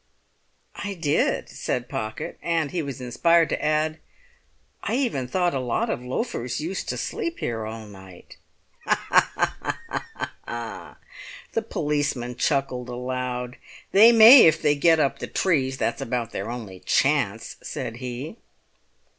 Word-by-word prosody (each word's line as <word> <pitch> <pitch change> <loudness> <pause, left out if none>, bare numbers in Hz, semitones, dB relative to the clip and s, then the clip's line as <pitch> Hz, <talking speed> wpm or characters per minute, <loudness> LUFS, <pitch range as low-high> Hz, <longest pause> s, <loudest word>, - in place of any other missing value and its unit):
"I 200 -1 -4
did," 160 -5 0
said - - -3
Pocket; 110 0 -5
and 165 -4 0
he 180 - -1
was 140 -3 -6
inspired 165 +7 +3
to - - -2
add, 155 +1 +1 0.8
"I 225 - -1
even 235 - -1
thought 175 +5 +1
a 135 - -1
lot 125 -2 -1
of - - -3
loafers 125 - -3
used 170 +5 -4
to - - -2
sleep 335 0 -3
here 115 -2 -3
all 110 0 -7
night!" 95 -3 -14 2.1
The 120 -1 -7
policeman 145 -5 -1
chuckled 130 -3 0
aloud. 125 0 -4 0.3
"They 220 +4 +8
may 230 0 +10
if 160 0 +3
they 150 -2 +3
get 160 +3 +4
up 140 - +1
the - - -5
trees; 135 -8 0
that's 115 - -1
about 115 -1 -2
their 100 +3 -4
only 110 -6 -7
chance," - - 0
said 115 - -5
he. 130 - -6
135 Hz, 130 wpm, -24 LUFS, 120-165 Hz, 2.1 s, may